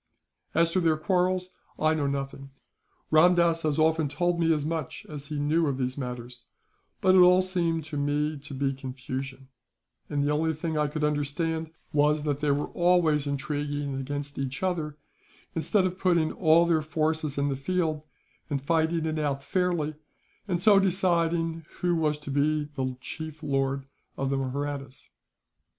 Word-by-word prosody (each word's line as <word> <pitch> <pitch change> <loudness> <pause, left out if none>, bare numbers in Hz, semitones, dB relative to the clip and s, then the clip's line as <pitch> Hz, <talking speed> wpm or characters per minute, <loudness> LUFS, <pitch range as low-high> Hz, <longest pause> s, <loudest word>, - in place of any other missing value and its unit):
"As 165 0 +3
to 185 - +2
their 165 -3 +2
quarrels, 185 +2 0 0.2
I 155 0 +3
know 150 -3 0
nothing. 135 0 -4 0.6
Ramdass 170 +1 +5
has 155 -3 0
often 160 -1 +3
told 175 +4 0
me 165 -1 +3
as 150 -2 +1
much 160 -4 -4
as 145 -2 -8
he 150 - -4
knew 155 +3 +2
of 135 -2 -1
these 130 -1 -2
matters, 125 -2 -7 0.5
but 185 - +5
it 190 - +7
all 180 +1 +7
seemed 170 -3 0
to 150 0 -6
me 145 +1 0
to 145 0 -9
be 135 0 0
confusion; 130 0 -6 0.6
and 145 -1 0
the 145 - +1
only 160 +1 +1
thing 160 +1 -3
I 150 -1 +2
could 150 +1 -4
understand 150 +2 -1 0.2
was 150 0 +3
that 145 -2 -1
they 150 -1 0
were 140 +1 0
always 170 -5 +3
intriguing 145 0 -2
against 140 +2 -4
each 135 +4 -3
other, 160 -5 -1 0.6
instead 185 +4 +1
of 185 0 -3
putting 170 -4 +2
all 165 -1 +4
their 165 -2 +2
forces 155 -1 -1
in 140 0 +1
the 135 - -1
field, 155 +2 -1 0.5
and 145 -2 0
fighting 160 +3 +1
it 155 0 -1
out 140 -2 -1
fairly, 175 -4 0 0.5
and 180 -3 0
so 200 +1 +6
deciding 170 -3 +1 0.2
who 175 -1 +2
was 155 -2 +1
to 140 - -6
be 150 +2 +2
the 130 -2 -3
chief 160 +3 -7
lord 135 -1 0 0.3
of 135 0 -1
the 135 - +1
Mahrattas." 135 0 -4
155 Hz, 170 wpm, -27 LUFS, 140-165 Hz, 0.6 s, it